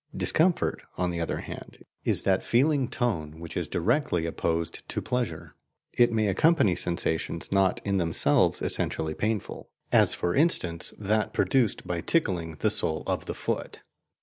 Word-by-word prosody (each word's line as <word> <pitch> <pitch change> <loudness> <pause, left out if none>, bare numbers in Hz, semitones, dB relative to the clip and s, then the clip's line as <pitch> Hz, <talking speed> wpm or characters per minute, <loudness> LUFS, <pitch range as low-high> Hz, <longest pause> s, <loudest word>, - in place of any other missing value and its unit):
Discomfort, 175 +2 +1 0.2
on 90 -1 0
the 85 - -3
other 85 - -2
hand, - - -10 0.2
is - - +1
that 95 -1 +2
feeling 135 +2 +2
tone 80 - -2
which 85 -1 -8
is - - -2
directly 100 - 0
opposed 85 0 -2
to - - -2
pleasure. 125 -2 -3 0.4
It 120 - +4
may 110 -1 +1
accompany 105 - +3
sensations 85 -2 -2
not 95 -1 +2
in 100 -1 +1
themselves 85 -3 +2
essentially 80 -1 -1
painful; 105 +3 -3 0.2
as - - +5
for 90 - -1
instance 90 - +1
that 105 +1 0
produced 125 -6 +1
by 85 -1 -2
tickling 90 - 0
the - - +1
sole 80 - -1
of - - -2
the - - -4
foot. - - -4
95 Hz, 150 wpm, -27 LUFS, 85-120 Hz, 0.4 s, as